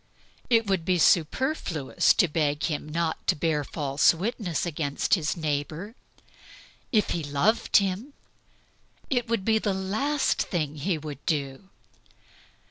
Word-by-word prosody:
It 230 Hz, -2 st, +4 dB
would 190 Hz, -4 st, 0 dB
be 180 Hz, +1 st, +1 dB
superfluous 170 Hz, -, +2 dB
to 180 Hz, -, +4 dB
beg 150 Hz, -1 st, -1 dB
him 155 Hz, -2 st, -2 dB
not 165 Hz, +1 st, -2 dB
to -, -, +3 dB
bear 150 Hz, -1 st, 0 dB
false 140 Hz, +1 st, +2 dB
witness 185 Hz, -, -2 dB
against 150 Hz, -4 st, -2 dB
his 165 Hz, -3 st, +1 dB
neighbor. 155 Hz, +6 st, -3 dB, 1.0 s
If 215 Hz, -3 st, +2 dB
he 165 Hz, -, -2 dB
loved 145 Hz, +11 st, +2 dB
him 200 Hz, +8 st, -1 dB, 1.0 s
it 245 Hz, -2 st, +1 dB
would 225 Hz, -4 st, -1 dB
be 220 Hz, -1 st, +3 dB
the 205 Hz, -3 st, -1 dB
last 220 Hz, +10 st, 0 dB
thing 155 Hz, -4 st, -2 dB
he 165 Hz, +4 st, -1 dB
would 145 Hz, -2 st, -8 dB
do. 145 Hz, +2 st, -2 dB
170 Hz, 130 wpm, -26 LUFS, 150-205 Hz, 1.0 s, It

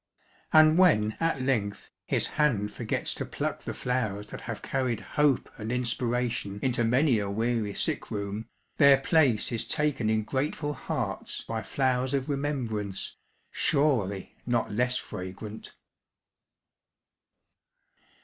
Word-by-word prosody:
And 155 Hz, +2 st, +7 dB
when 110 Hz, -13 st, +4 dB
at 165 Hz, -5 st, 0 dB
length 110 Hz, -7 st, -1 dB, 0.2 s
his -, -, +2 dB
hand 120 Hz, -10 st, +1 dB
forgets -, -, -2 dB
to -, -, -3 dB
pluck -, -, -3 dB
the -, -, -3 dB
flowers 110 Hz, -5 st, -1 dB
that -, -, -6 dB
have -, -, -6 dB
carried 130 Hz, -4 st, -1 dB
hope 150 Hz, -4 st, +2 dB
and 110 Hz, +1 st, -4 dB
inspiration 120 Hz, -4 st, -1 dB
into 125 Hz, -2 st, +1 dB
many 125 Hz, +1 st, +3 dB
a 100 Hz, -1 st, -2 dB
weary 110 Hz, 0 st, -1 dB
sick -, -, -1 dB
room, 100 Hz, +2 st, -4 dB, 0.3 s
their 140 Hz, -2 st, +7 dB
place 135 Hz, -5 st, +2 dB
is 115 Hz, -, -1 dB
taken 150 Hz, -8 st, 0 dB
in 110 Hz, 0 st, +2 dB
grateful 145 Hz, +5 st, -2 dB
hearts -, -, -3 dB
by 115 Hz, -1 st, -4 dB
flowers 130 Hz, +3 st, 0 dB
of 135 Hz, +1 st, -2 dB
remembrance, 120 Hz, -9 st, -2 dB, 0.4 s
surely 120 Hz, -, +1 dB
not 120 Hz, -2 st, +1 dB
less 125 Hz, +4 st, +1 dB
fragrant. 95 Hz, +4 st, -7 dB
125 Hz, 125 wpm, -28 LUFS, 105-140 Hz, 0.4 s, And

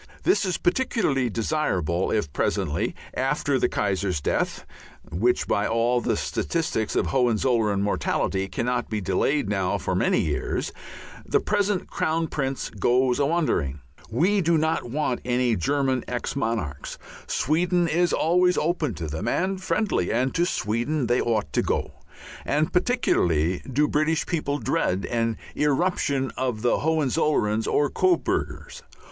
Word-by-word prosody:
This 370 Hz, -, +3 dB
is 185 Hz, -, -1 dB
particularly 175 Hz, -, +1 dB
desirable 95 Hz, -, 0 dB
if 80 Hz, -11 st, -1 dB
presently, -, -, -1 dB, 0.2 s
after -, -, 0 dB
the -, -, +2 dB
Kaiser's 95 Hz, -4 st, -1 dB
death -, -, -1 dB, 0.5 s
which 120 Hz, +8 st, +1 dB
by 100 Hz, -, +1 dB
all 120 Hz, +2 st, +1 dB
the -, -, 0 dB
statistics 160 Hz, -10 st, -2 dB
of -, -, +2 dB
Hohenzollern 115 Hz, -5 st, +1 dB
mortality 95 Hz, -1 st, 0 dB
cannot 120 Hz, +5 st, -2 dB
be 110 Hz, -, -1 dB
delayed 100 Hz, +8 st, 0 dB
now 95 Hz, -3 st, 0 dB
for -, -, -3 dB
many -, -, +2 dB
years 75 Hz, -2 st, -2 dB, 0.5 s
the -, -, +1 dB
present 205 Hz, -2 st, 0 dB
Crown 165 Hz, +1 st, 0 dB
Prince 135 Hz, -2 st, -3 dB
goes 125 Hz, +1 st, +2 dB
a 140 Hz, -, +3 dB
wandering. 120 Hz, -, 0 dB, 0.3 s
We 180 Hz, -, +2 dB
do 170 Hz, -1 st, +3 dB
not 160 Hz, -5 st, 0 dB
want 140 Hz, -1 st, -1 dB
any 125 Hz, -1 st, +1 dB
German 130 Hz, -, 0 dB
ex 125 Hz, +2 st, -3 dB
monarchs; 110 Hz, -, -3 dB, 0.3 s
Sweden 175 Hz, +4 st, +1 dB
is 175 Hz, +2 st, +2 dB
always 180 Hz, +2 st, +3 dB
open 155 Hz, -, 0 dB
to 80 Hz, -, -5 dB
them 80 Hz, +9 st, -4 dB
and 190 Hz, +8 st, 0 dB
friendly, 200 Hz, -, 0 dB
and 130 Hz, +3 st, +1 dB
to 175 Hz, +1 st, +2 dB
Sweden 120 Hz, -, -1 dB
they 120 Hz, +1 st, +2 dB
ought 110 Hz, -10 st, -1 dB
to -, -, +2 dB
go; -, -, -1 dB, 0.5 s
and 150 Hz, +2 st, 0 dB
particularly 90 Hz, -, +1 dB
do 145 Hz, +4 st, +2 dB
British 155 Hz, +2 st, +1 dB
people 150 Hz, -4 st, -1 dB
dread 100 Hz, -, 0 dB
an 115 Hz, -1 st, -1 dB, 0.2 s
irruption 145 Hz, -3 st, 0 dB
of 125 Hz, -4 st, -2 dB
Hohenzollerns 140 Hz, -6 st, +1 dB
or 145 Hz, -, +2 dB
Coburgers. 370 Hz, -2 st, 0 dB
130 Hz, 140 wpm, -25 LUFS, 110-160 Hz, 0.5 s, This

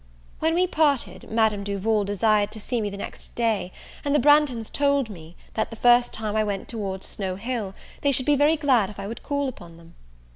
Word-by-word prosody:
When 320 Hz, +1 st, +1 dB
we 360 Hz, +1 st, +3 dB
parted, 300 Hz, -7 st, 0 dB
Madame 220 Hz, -2 st, +1 dB
Duval 205 Hz, +1 st, 0 dB
desired 205 Hz, +1 st, +2 dB
to 220 Hz, -, -6 dB
see 235 Hz, +2 st, -2 dB
me 205 Hz, -, -1 dB
the 200 Hz, -, -7 dB
next -, -, -8 dB
day; 220 Hz, -6 st, 0 dB, 0.3 s
and 285 Hz, 0 st, +1 dB
the -, -, +5 dB
Branghtons 290 Hz, -6 st, +3 dB
told 280 Hz, -4 st, +1 dB
me, 165 Hz, -2 st, -12 dB, 0.2 s
that 220 Hz, -, -1 dB
the 225 Hz, -, -8 dB
first 240 Hz, +1 st, +4 dB
time 215 Hz, -1 st, -4 dB
I 215 Hz, -, +3 dB
went 200 Hz, -2 st, -3 dB
towards 195 Hz, -4 st, -4 dB
Snow 190 Hz, -2 st, -4 dB
Hill, 215 Hz, -2 st, -4 dB, 0.3 s
they 285 Hz, -, +3 dB
should 260 Hz, -1 st, +1 dB
be 295 Hz, -, +4 dB
very 295 Hz, +3 st, +4 dB
glad 260 Hz, -10 st, +2 dB
if 210 Hz, -, -11 dB
I 195 Hz, -, -5 dB
would 225 Hz, +3 st, -6 dB
call 285 Hz, -1 st, -1 dB
upon 170 Hz, -10 st, -9 dB
them. 170 Hz, 0 st, -17 dB
220 Hz, 215 wpm, -24 LUFS, 200-280 Hz, 0.3 s, the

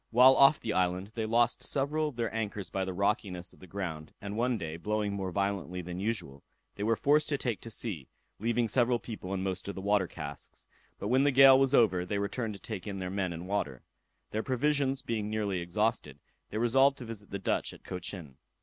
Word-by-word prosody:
While 125 Hz, +3 st, +7 dB
off 140 Hz, +2 st, +6 dB
the 110 Hz, -, -2 dB
island, 90 Hz, +2 st, 0 dB
they 110 Hz, -2 st, -2 dB
lost 120 Hz, +1 st, +2 dB
several 150 Hz, +3 st, 0 dB
of 145 Hz, -, -6 dB
their 115 Hz, -2 st, -2 dB
anchors 105 Hz, -4 st, -3 dB
by 95 Hz, -1 st, -1 dB
the 95 Hz, -, -3 dB
rockiness 95 Hz, -2 st, -1 dB
of -, -, -20 dB
the 95 Hz, -, -13 dB
ground; 85 Hz, -5 st, -5 dB
and 100 Hz, 0 st, -5 dB
one 120 Hz, +1 st, +1 dB
day, 80 Hz, -5 st, -5 dB
blowing 105 Hz, +3 st, -1 dB
more 95 Hz, -2 st, -3 dB
violently 95 Hz, -2 st, -2 dB
than 90 Hz, +1 st, -6 dB
usual, 90 Hz, -10 st, -3 dB, 0.3 s
they -, -, -9 dB
were 115 Hz, +2 st, +2 dB
forced 150 Hz, +5 st, +3 dB
to 145 Hz, -, +1 dB
take 120 Hz, -6 st, -2 dB
to 115 Hz, -, -6 dB
sea, 105 Hz, -, -4 dB, 0.3 s
leaving 115 Hz, +2 st, +1 dB
several 120 Hz, +2 st, +3 dB
people 110 Hz, -5 st, -7 dB
and 95 Hz, -1 st, -1 dB
most 95 Hz, -1 st, -3 dB
of 100 Hz, -, -4 dB
the -, -, -5 dB
water 100 Hz, -2 st, +2 dB
casks; 75 Hz, -4 st, -7 dB, 0.3 s
but 100 Hz, -, -4 dB
when 130 Hz, +3 st, +4 dB
the 145 Hz, -, +4 dB
gale 135 Hz, 0 st, +8 dB
was 135 Hz, 0 st, +3 dB
over, 95 Hz, -8 st, +4 dB
they 100 Hz, +3 st, -2 dB
returned 105 Hz, +2 st, -2 dB
to -, -, -11 dB
take 105 Hz, 0 st, -6 dB
in 100 Hz, -1 st, -4 dB
their 90 Hz, -1 st, -4 dB
men 95 Hz, -2 st, -1 dB
and 85 Hz, +2 st, -6 dB
water. 75 Hz, -11 st, -2 dB, 0.5 s
Their 110 Hz, -, -1 dB
provisions 135 Hz, +1 st, 0 dB
being 110 Hz, -2 st, -2 dB
nearly 105 Hz, -4 st, -1 dB
exhausted, 85 Hz, -, -1 dB, 0.3 s
they 105 Hz, -, -4 dB
resolved 135 Hz, +4 st, +4 dB
to 125 Hz, -, -7 dB
visit 110 Hz, -3 st, -8 dB
the 100 Hz, -, -3 dB
Dutch 95 Hz, -, -1 dB
at -, -, -14 dB
Cochin. 90 Hz, -6 st, -6 dB
105 Hz, 220 wpm, -30 LUFS, 95-120 Hz, 0.5 s, gale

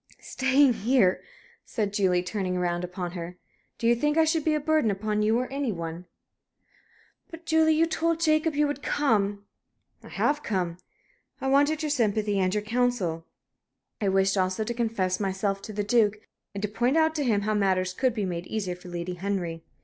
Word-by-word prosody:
"Staying 265 Hz, 0 st, +3 dB
here?" 220 Hz, -4 st, +2 dB, 0.4 s
said 205 Hz, -3 st, -3 dB
Julie, 185 Hz, -4 st, +2 dB
turning 185 Hz, -1 st, -2 dB
round 175 Hz, -1 st, -1 dB
upon 180 Hz, 0 st, -5 dB
her. 175 Hz, 0 st, -7 dB, 0.4 s
"Do -, -, -5 dB
you 235 Hz, -, +5 dB
think 295 Hz, +5 st, 0 dB
I 320 Hz, -, +5 dB
should 320 Hz, -1 st, +1 dB
be 310 Hz, 0 st, +2 dB
a -, -, +1 dB
burden 310 Hz, -5 st, +2 dB
upon 210 Hz, +1 st, -1 dB
you, 220 Hz, +2 st, +2 dB
or 250 Hz, -, 0 dB
any 275 Hz, -4 st, -1 dB
one?" 170 Hz, -1 st, -6 dB, 1.2 s
"But, 330 Hz, +1 st, -11 dB
Julie, 320 Hz, -1 st, +3 dB
you 325 Hz, +2 st, +4 dB
told 330 Hz, 0 st, 0 dB
Jacob 310 Hz, -1 st, +2 dB
you 295 Hz, +1 st, +3 dB
would 290 Hz, -1 st, -3 dB
come." 205 Hz, -7 st, 0 dB, 0.6 s
"I -, -, -14 dB
have 295 Hz, +1 st, 0 dB
come. 180 Hz, -7 st, -2 dB, 0.6 s
I -, -, -6 dB
wanted 290 Hz, +3 st, +3 dB
your 305 Hz, -, -1 dB
sympathy, 215 Hz, -5 st, +1 dB
and 185 Hz, -1 st, +1 dB
your 210 Hz, +1 st, -1 dB
counsel. 210 Hz, -8 st, -1 dB, 0.7 s
I 200 Hz, -, +2 dB
wished 195 Hz, +1 st, +2 dB
also 185 Hz, +3 st, 0 dB
to 240 Hz, -, -3 dB
confess 220 Hz, -6 st, -1 dB
myself 195 Hz, 0 st, -1 dB
to 215 Hz, -, -8 dB
the 205 Hz, 0 st, -2 dB
Duke, 210 Hz, -1 st, +3 dB, 0.4 s
and 200 Hz, -, -5 dB
to -, -, +1 dB
point 240 Hz, +7 st, +1 dB
out 320 Hz, 0 st, +3 dB
to 305 Hz, -2 st, -1 dB
him 220 Hz, -6 st, +2 dB
how 215 Hz, +1 st, -1 dB
matters 185 Hz, -3 st, +1 dB
could 255 Hz, +3 st, 0 dB
be 210 Hz, -3 st, -1 dB
made 175 Hz, -1 st, -4 dB
easier 195 Hz, -5 st, -3 dB
for 180 Hz, 0 st, -12 dB
Lady 175 Hz, +1 st, -4 dB
Henry." 180 Hz, -3 st, -3 dB
210 Hz, 190 wpm, -26 LUFS, 185-275 Hz, 1.2 s, you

